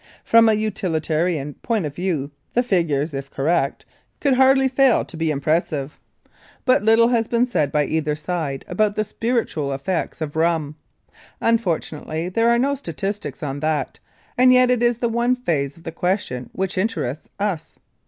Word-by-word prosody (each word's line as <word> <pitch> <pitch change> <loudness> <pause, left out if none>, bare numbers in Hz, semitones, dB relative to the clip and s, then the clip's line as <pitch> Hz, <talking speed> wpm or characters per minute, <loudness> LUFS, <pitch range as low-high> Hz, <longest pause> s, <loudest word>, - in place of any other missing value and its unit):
From 230 0 +5
a - - +4
utilitarian 165 -7 -1
point 225 -7 0
of 145 - -4
view 160 -5 -2 0.2
the 245 - +3
figures, 165 - 0
if 135 0 -5
correct, 140 0 0 0.3
could 280 -2 +2
hardly 265 +1 +5
fail 265 -1 +3
to - - -11
be 160 0 -1
impressive, 150 -1 -1 0.7
but 255 -4 +4
little 225 +2 +5
has 230 -2 +1
been 235 +1 +2
said 150 - 0
by 150 -1 +2
either 155 -1 -1
side 150 -3 -4
about 205 +3 +1
the 215 - +1
spiritual 220 - -1
aspects 140 +7 -3
of 155 -2 -4
rum. 160 -2 0 0.6
Unfortunately 170 -6 -1
there 230 +5 +2
are 235 - +4
no 275 +4 +2
statistics 200 - -5
on 140 -1 -3
that, 155 -3 -2 0.4
and 255 0 +7
yet 255 0 +5
it 245 -2 +1
is 240 -1 +2
the 240 - 0
one 235 +2 +1
phase 150 - -2
of 165 - -17
the 165 - -5
question 165 - -2
which 190 0 -2
interests 155 - -2
us. 200 -6 -3
175 Hz, 165 wpm, -22 LUFS, 150-230 Hz, 0.7 s, and